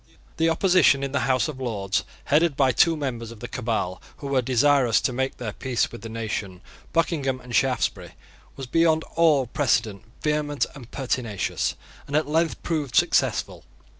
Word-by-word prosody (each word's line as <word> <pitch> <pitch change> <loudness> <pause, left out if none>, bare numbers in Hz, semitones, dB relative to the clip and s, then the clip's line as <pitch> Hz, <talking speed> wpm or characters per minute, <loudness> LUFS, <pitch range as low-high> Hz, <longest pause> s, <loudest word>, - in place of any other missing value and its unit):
The 165 +1 +3
opposition 165 -5 +4
in 140 - -2
the 140 -1 -1
House 130 +2 +2
of 145 -4 -7
Lords, 100 -6 -1 0.2
headed 150 0 +2
by 135 -2 +4
two 165 +6 +3
members 120 -6 -4
of 115 -2 -11
the 120 - -6
Cabal 100 -7 -2 0.2
who 145 - -10
were 135 -2 +2
desirous 130 -1 +3
to 130 - 0
make 130 +2 -2
their 110 -4 -5
peace 125 0 -1
with - - -9
the 115 - -7
nation, 105 -5 -4 0.3
Buckingham 145 -6 0
and 125 -2 -6
Shaftesbury, 130 +4 0 0.4
was 135 - -6
beyond 160 +3 +2
all 155 -5 +4
precedent 115 -5 0 0.2
vehement 150 -2 0
and 125 -4 -12
pertinacious, 125 -6 -2 0.3
and 145 - -4
at 155 0 +2
length 160 +2 0
proved 150 - -2
successful. - - +1
135 Hz, 165 wpm, -24 LUFS, 115-150 Hz, 0.4 s, opposition